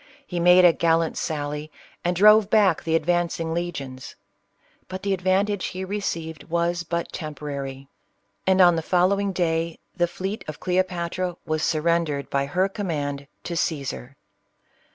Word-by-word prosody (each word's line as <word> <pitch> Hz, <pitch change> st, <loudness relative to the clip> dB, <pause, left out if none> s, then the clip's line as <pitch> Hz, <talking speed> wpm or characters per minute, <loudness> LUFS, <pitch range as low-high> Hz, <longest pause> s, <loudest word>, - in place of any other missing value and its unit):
He 180 Hz, -9 st, -4 dB
made 180 Hz, +1 st, +7 dB
a 170 Hz, -, +7 dB
gallant 165 Hz, -1 st, +1 dB
sally, 150 Hz, 0 st, -3 dB, 0.3 s
and 175 Hz, +1 st, 0 dB
drove 210 Hz, +2 st, +6 dB
back 205 Hz, -7 st, +4 dB
the 165 Hz, 0 st, +1 dB
advancing 165 Hz, 0 st, 0 dB
legions. 140 Hz, -7 st, -5 dB, 0.7 s
But 185 Hz, 0 st, -7 dB
the 200 Hz, -1 st, +1 dB
advantage 190 Hz, +2 st, +1 dB
he 185 Hz, +1 st, -5 dB
achieved 170 Hz, -5 st, -4 dB
was 170 Hz, +1 st, 0 dB
but 170 Hz, 0 st, -3 dB
temporary, 140 Hz, -3 st, -6 dB, 0.6 s
and 190 Hz, 0 st, +5 dB
on 175 Hz, -1 st, +7 dB
the 165 Hz, -, -1 dB
following 190 Hz, +4 st, +2 dB
day 165 Hz, -2 st, -1 dB, 0.2 s
the 175 Hz, -1 st, +2 dB
fleet 190 Hz, +5 st, -5 dB
of 155 Hz, -, -7 dB
Cleopatra 180 Hz, -1 st, -1 dB
was 155 Hz, 0 st, -1 dB
surrendered 160 Hz, -3 st, 0 dB
by 140 Hz, 0 st, 0 dB
her 185 Hz, +6 st, +1 dB
command 145 Hz, -8 st, -3 dB, 0.2 s
to 170 Hz, -, -4 dB
Caesar. 140 Hz, -5 st, -3 dB
170 Hz, 140 wpm, -24 LUFS, 155-185 Hz, 0.7 s, made